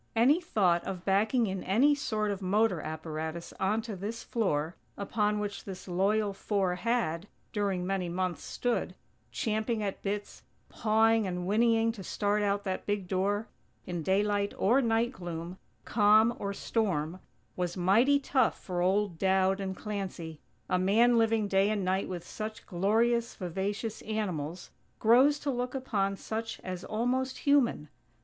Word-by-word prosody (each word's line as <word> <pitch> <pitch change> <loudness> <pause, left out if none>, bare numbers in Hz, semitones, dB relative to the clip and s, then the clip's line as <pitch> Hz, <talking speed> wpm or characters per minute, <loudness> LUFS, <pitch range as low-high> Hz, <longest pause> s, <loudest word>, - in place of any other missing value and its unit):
Any 270 +10 +4
thought 180 - +2
of 185 -2 -6
backing 215 +5 +2
in 190 -2 -3
any 250 +10 +4
sort 220 -7 -1
of 200 -1 -4
motor 195 -2 +2
apparatus 160 +1 -5
onto 215 +2 -1
this 210 +5 -5
floor, 165 -8 -1 0.2
upon 210 +1 0
which 205 -1 -4
this 190 -1 -8
loyal 200 +3 +1
four 195 -2 0
had, 190 -4 -1 0.3
during 195 -4 -1
many 185 -2 -1
months, 180 -2 -2
stood, 245 -1 -2 0.4
champing 220 0 -1
at 200 -2 -3
bits, 205 +1 -4 0.3
pawing 220 0 +3
and 180 -1 -3
whinnying 225 +3 +3
to 210 -4 -9
start 205 +3 0
out 205 0 0
that 190 -2 -4
big 205 -3 -1
door, 200 +4 0 0.4
in 175 -3 -3
daylight 200 +3 +1
or 245 +8 +4
night 230 0 +1
gloom, 175 -3 -7 0.3
calm 215 +2 +4
or 200 - -2
storm, 185 -6 -1 0.4
was 180 0 -2
mighty 225 +11 +4
tough 265 -3 +1
for 180 -2 -3
old 190 -1 +1
Dowd 190 0 +2
and 190 -1 -4
Clancy. 185 -7 -5 0.3
A 180 - +1
man 230 +6 +4
living 225 -2 +2
day 195 +1 +3
and 205 -3 -1
night 190 +1 0
with 175 -2 -5
such 215 0 -6
glorious, 225 +6 +1
vivacious 200 +4 -3
animals, 180 -6 -4 0.3
grows 255 +6 +5
to 285 - -1
look 250 +1 -3
upon 200 -7 -1
such 225 +2 -4
as 185 -1 -6
almost 255 +4 -1
human. 275 - +2
205 Hz, 150 wpm, -30 LUFS, 185-225 Hz, 0.4 s, grows